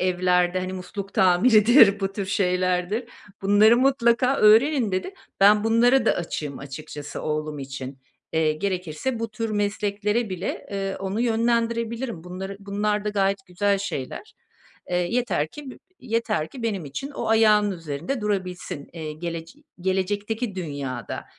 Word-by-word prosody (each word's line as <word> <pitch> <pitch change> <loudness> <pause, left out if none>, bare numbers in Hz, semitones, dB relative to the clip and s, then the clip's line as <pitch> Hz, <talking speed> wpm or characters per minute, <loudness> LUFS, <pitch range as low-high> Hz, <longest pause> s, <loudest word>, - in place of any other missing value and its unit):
evlerde, 180 0 +2
hani, 185 0 -4
musluk 195 +2 -7
tamiridir, 210 +3 +6
bu 195 0 -1
tür 200 -1 -4
şeylerdir. 185 +3 0 0.4
Bunları 205 +4 +6
mutlaka 255 0 +3
öğrenin." 225 +1 +5
dedi. 185 - -2 0.3
Ben, 210 +1 +6
bunlara 240 +4 +4
da - - +5
açığım 150 -4 -4
açıkçası 145 +1 -8
oğlum 155 -1 -3
için. 135 0 -7 0.3
Eee, 160 -1 +2
gerekirse 185 +7 -3
bu 230 0 -3
tür 225 +1 -3
mesleklere 205 +1 -1
bile, 185 +1 -4
ııı, 195 -1 -2
onu 195 +3 -3
yönlendirebilirim. 230 -3 0
Bunları 190 +2 -6
bunlar 205 +1 -1
da - - 0
gayet 195 -1 0
güzel 200 +2 +1
şeyler. 200 - -5 0.6
Eee, 175 - +1
yeter 180 -4 0
ki 285 - -9
bi - - -12 0.2
yeter 225 -10 -1
ki 255 - -10
benim 200 -7 -2
için 205 - -6
o 230 -5 -4
ayağının 215 -2 +4
üzerinde 165 - -4
durabilsin, 185 -8 -3
eee, 155 -2 -6
gelec 165 - -6 0.3
gelecekteki 205 +4 -1
dünyada. 145 -7 -5
200 Hz, 140 wpm, -24 LUFS, 175-225 Hz, 0.6 s, tamiridir